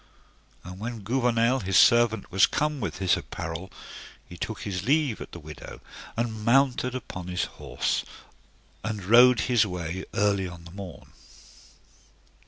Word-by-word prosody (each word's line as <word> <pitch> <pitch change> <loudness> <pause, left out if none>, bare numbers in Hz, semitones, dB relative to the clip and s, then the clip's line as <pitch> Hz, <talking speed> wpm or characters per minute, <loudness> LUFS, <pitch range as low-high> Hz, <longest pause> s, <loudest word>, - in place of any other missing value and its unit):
And 90 +1 -9
when 115 +1 -5
Gouvernail, 120 +2 +2
his 95 -4 +1
servant, 120 +1 +4
was 95 0 +5
come 150 -1 -1
with - - -3
his 95 -2 +2
apparel, 85 +3 -6 0.6
he 90 - -11
took 110 +5 -5
his 95 -3 -3
leave 140 - +1
at - - -8
the 85 - -9
widow, 75 -1 -10 0.4
and 110 -2 -2
mounted 125 +1 +3
upon 90 -7 -6
his 90 0 -1
horse, - - -2 0.8
and 105 -4 -4
rode 120 +2 +7
his 120 -4 +3
way 90 -2 -4
early 100 -3 +2
on 90 -1 -10
the 85 - -11
morn. 90 -7 -10
105 Hz, 145 wpm, -26 LUFS, 90-120 Hz, 0.8 s, rode